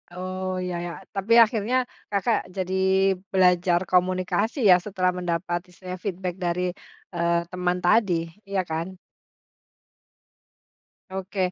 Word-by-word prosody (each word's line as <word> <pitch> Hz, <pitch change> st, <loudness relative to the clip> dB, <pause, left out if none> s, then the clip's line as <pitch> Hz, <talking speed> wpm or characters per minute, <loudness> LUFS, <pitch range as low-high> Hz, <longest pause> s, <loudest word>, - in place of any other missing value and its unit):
Oh, 185 Hz, 0 st, -4 dB
ya 180 Hz, -1 st, -3 dB
ya. 175 Hz, 0 st, -4 dB, 0.2 s
Tapi 195 Hz, +4 st, +1 dB
akhirnya, 230 Hz, +3 st, 0 dB, 0.3 s
Kakak, 210 Hz, +3 st, +2 dB, 0.2 s
jadi 185 Hz, 0 st, -2 dB, 0.6 s
belajar 180 Hz, -2 st, +4 dB
komunikasi, 185 Hz, -, +1 dB
ya? 180 Hz, -, +7 dB
Setelah 185 Hz, -1 st, 0 dB
mendapat, 175 Hz, 0 st, -1 dB
istilahnya 180 Hz, 0 st, -8 dB
feedback 185 Hz, -2 st, -3 dB
dari, 180 Hz, 0 st, -1 dB, 0.4 s
eee, 170 Hz, 0 st, +2 dB
teman 180 Hz, 0 st, 0 dB
tadi, 175 Hz, -4 st, +2 dB, 0.2 s
iya 195 Hz, -2 st, 0 dB
kan? 170 Hz, +3 st, -4 dB, 2.1 s
Oke. 190 Hz, -1 st, -2 dB
185 Hz, 110 wpm, -25 LUFS, 175-190 Hz, 2.1 s, ya